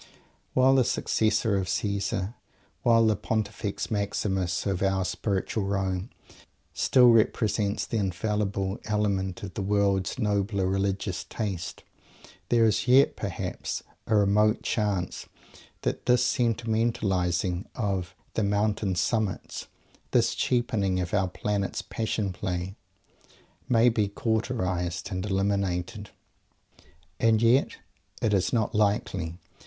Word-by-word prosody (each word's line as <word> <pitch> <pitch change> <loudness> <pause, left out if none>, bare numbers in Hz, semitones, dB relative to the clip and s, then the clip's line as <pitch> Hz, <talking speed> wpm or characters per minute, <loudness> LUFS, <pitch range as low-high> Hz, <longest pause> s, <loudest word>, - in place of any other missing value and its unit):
While 130 +1 +5
the 130 -1 +5
Successor 110 -2 +1
of 95 -2 -2
Caesar, 100 +1 -1 0.5
while 115 -1 +5
the 110 -1 +3
Pontifex 105 +1 -3
Maximus 95 -3 -1
of 95 -2 -1
our 95 -1 +1
"Spiritual 100 +1 -1
Rome," 95 +1 -1 0.6
still 125 -2 +5
represents 105 -2 +2
the 115 - -2
Infallible 100 0 -1
Element 100 -4 -1
in 100 - -5
the 105 - -4
world's 100 0 +1
nobler 100 -3 0
religious 95 -1 -1
Taste, 100 -6 -4 0.7
there 115 -1 +4
is 110 +3 +1
yet, 130 +3 +5
perhaps, - - -4 0.2
a 110 - +2
remote 105 +2 +3
chance 100 -5 -1 0.6
that - - -2
this 125 0 +3
vulgarizing 105 -6 0
of 95 -6 -2 0.2
"the 110 - 0
mountain 100 -1 0
summits" 105 +2 -1 0.4
this - - +2
degrading 110 -7 +1
of 90 -2 -3
our 100 -2 +2
Planet's 100 +1 -2
Passion 110 -3 -2
Play, 90 0 -3 0.9
may 120 -1 +5
be 110 -3 +2
cauterized 100 -5 -2
and 90 -1 -2
eliminated. 100 -1 -1 1.1
And 110 -1 +4
yet 115 +4 +3 0.5
it 110 - +1
is 95 -2 +2
not 110 -3 0
likely! 100 -5 0
100 Hz, 115 wpm, -27 LUFS, 95-110 Hz, 1.1 s, While